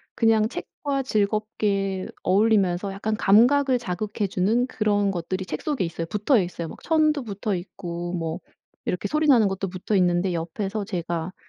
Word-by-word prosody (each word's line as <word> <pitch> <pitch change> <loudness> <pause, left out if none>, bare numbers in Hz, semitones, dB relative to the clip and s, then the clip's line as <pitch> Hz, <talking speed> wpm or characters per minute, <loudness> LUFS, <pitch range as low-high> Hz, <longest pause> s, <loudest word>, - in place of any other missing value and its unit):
그냥 220 -2 +3
책과 275 +2 -4
즐겁게 205 -3 0 0.2
어울리면서 195 -1 +2
약간 215 +2 -2
감각을 250 +7 +5
자극해 205 -1 -3
주는 220 +8 +1
그런 205 -3 +1
것들이 185 +1 -3
책 155 - -5
속에 285 -10 -1
있어요. 165 0 -4
붙어있어요. 190 - 0
막 - - -11
천도 310 -3 +2
붙어있고 185 -4 -4
뭐 165 -1 -3 0.5
이렇게 180 - -2
소리 305 +1 +1
나는 230 -8 +5
것도 195 0 -3
붙어 185 +3 -3
있는데 180 0 +2
옆에서 195 +5 -3
제가 175 -2 -3
200 Hz, 340 characters per minute, -24 LUFS, 180-225 Hz, 0.5 s, 감각을